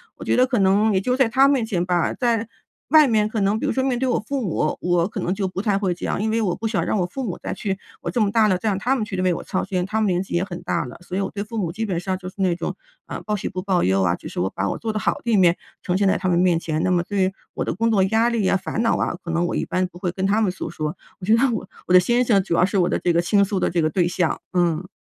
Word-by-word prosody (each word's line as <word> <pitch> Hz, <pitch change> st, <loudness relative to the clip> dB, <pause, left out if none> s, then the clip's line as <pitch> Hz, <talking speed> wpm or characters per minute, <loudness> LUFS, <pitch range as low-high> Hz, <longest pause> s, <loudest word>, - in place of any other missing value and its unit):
我 -, -, -9 dB
觉 -, -, +2 dB
得 250 Hz, -, +5 dB
可 250 Hz, -2 st, 0 dB
能 200 Hz, +3 st, +3 dB
也 190 Hz, -, +3 dB
就 250 Hz, +5 st, 0 dB
在 260 Hz, -3 st, +3 dB
他 265 Hz, +3 st, +5 dB
面 275 Hz, -4 st, +2 dB
前 180 Hz, -6 st, -1 dB
吧， 175 Hz, -2 st, +1 dB
在 230 Hz, -3 st, 0 dB, 0.4 s
外 305 Hz, 0 st, +7 dB
面 215 Hz, -3 st, +2 dB
可 220 Hz, -, -2 dB
能 200 Hz, +2 st, +2 dB
比 -, -, -2 dB
如 -, -, +1 dB
说 260 Hz, -, 0 dB
面 260 Hz, -2 st, 0 dB
对 260 Hz, -, 0 dB
我 245 Hz, -, +1 dB
父 275 Hz, +5 st, -3 dB
母， 160 Hz, -7 st, -1 dB
我 175 Hz, -1 st, +2 dB
可 -, -, -6 dB
能 180 Hz, -, -1 dB
就 195 Hz, -1 st, -1 dB
不 185 Hz, +1 st, -4 dB
太 205 Hz, -3 st, +1 dB
会 195 Hz, -3 st, 0 dB
讲， 175 Hz, -, -3 dB
因 220 Hz, -, 0 dB
为 230 Hz, -, +1 dB
我 185 Hz, -5 st, 0 dB
不 225 Hz, -, -3 dB
想 215 Hz, -2 st, 0 dB
让 -, -, 0 dB
我 180 Hz, -, +1 dB
父 265 Hz, +9 st, -5 dB
母 190 Hz, -7 st, -3 dB
再 -, -, -4 dB
去 195 Hz, -2 st, -3 dB, 0.2 s
我 -, -, -4 dB
这 245 Hz, -, -1 dB
么 205 Hz, -2 st, +2 dB
大 220 Hz, -1 st, +4 dB
了， 185 Hz, -3 st, +2 dB
再 220 Hz, -, -4 dB
让 195 Hz, -, 0 dB
他 255 Hz, +5 st, +1 dB
们 220 Hz, -5 st, -1 dB
去 200 Hz, -, -6 dB
为 185 Hz, -1 st, +2 dB
我 -, -, -5 dB
操 185 Hz, -, -2 dB
心。 180 Hz, -2 st, -2 dB
他 220 Hz, +3 st, -1 dB
们 215 Hz, -, +2 dB
年 180 Hz, -2 st, +1 dB
纪 -, -, -9 dB
也 175 Hz, +2 st, +1 dB
很 180 Hz, -3 st, -7 dB
大 -, -, -1 dB
了， 125 Hz, -, -9 dB
所 180 Hz, +1 st, -7 dB
以 -, -, 0 dB
我 195 Hz, -, -2 dB
对 200 Hz, 0 st, -4 dB
父 225 Hz, +2 st, -7 dB
母 175 Hz, -5 st, -1 dB
基 220 Hz, +5 st, -3 dB
本 180 Hz, -4 st, -2 dB
上 185 Hz, +1 st, -2 dB
就 185 Hz, -, -9 dB
是 -, -, -19 dB
那 180 Hz, -3 st, +2 dB
种， -, -, -4 dB, 0.3 s
啊， -, -, -6 dB
报 210 Hz, -, 0 dB
喜 195 Hz, -, -4 dB
不 185 Hz, -, -4 dB
报 185 Hz, -2 st, +1 dB
忧 95 Hz, +1 st, +2 dB
啊， 90 Hz, -2 st, +2 dB
就 -, -, -10 dB
是 -, -, -6 dB
我 95 Hz, +2 st, 0 dB
把 100 Hz, +1 st, -2 dB
我 -, -, -2 dB
做 225 Hz, -, -2 dB
得 215 Hz, -, -3 dB
好 -, -, +1 dB
的 235 Hz, -, -1 dB
一 210 Hz, -, +4 dB
面 175 Hz, -2 st, +5 dB, 0.3 s
呈 180 Hz, -, -1 dB
现 200 Hz, 0 st, +2 dB
在 190 Hz, -, +3 dB
他 185 Hz, -, -3 dB
们 175 Hz, -1 st, +2 dB
面 180 Hz, -2 st, +3 dB
前， 160 Hz, -1 st, -2 dB
那 185 Hz, -, +1 dB
么 175 Hz, -1 st, +2 dB
对 190 Hz, 0 st, 0 dB, 0.2 s
我 -, -, -2 dB
的 -, -, -3 dB
工 230 Hz, +4 st, +1 dB
作 205 Hz, -3 st, +3 dB
压 225 Hz, +4 st, +2 dB
力 225 Hz, -5 st, 0 dB
啊、 195 Hz, -, +3 dB
烦 195 Hz, +4 st, -3 dB
恼 230 Hz, -, +2 dB
啊， -, -, -1 dB
可 170 Hz, -, -7 dB
能 170 Hz, +1 st, +1 dB
我 175 Hz, -, -2 dB
一 -, -, 0 dB
般 185 Hz, 0 st, 0 dB
不 175 Hz, 0 st, -14 dB
会 180 Hz, -2 st, -1 dB
跟 190 Hz, +1 st, -2 dB
他 205 Hz, +3 st, +2 dB
们 205 Hz, -4 st, +2 dB
诉 185 Hz, -, -6 dB
说， 155 Hz, +3 st, -4 dB, 0.2 s
我 180 Hz, -, -7 dB
觉 220 Hz, -, +6 dB
得 265 Hz, +4 st, +3 dB
我 210 Hz, -4 st, -4 dB, 0.2 s
我 180 Hz, -, +1 dB
的 180 Hz, -, +9 dB
先 240 Hz, +7 st, +2 dB
生 205 Hz, -5 st, +4 dB
主 170 Hz, -, -1 dB
要 180 Hz, -, +4 dB
是 195 Hz, 0 st, 0 dB
我 175 Hz, -, +2 dB
的 -, -, +1 dB
这 175 Hz, -, 0 dB
个 170 Hz, -, +3 dB
倾 200 Hz, +3 st, +3 dB
诉 195 Hz, -1 st, -2 dB
的 -, -, +1 dB
这 170 Hz, -1 st, 0 dB
个 155 Hz, -, +2 dB
对 175 Hz, 0 st, +2 dB
象， 175 Hz, -1 st, -1 dB
嗯。 175 Hz, 0 st, +1 dB
190 Hz, 365 characters per minute, -22 LUFS, 180-220 Hz, 0.4 s, 的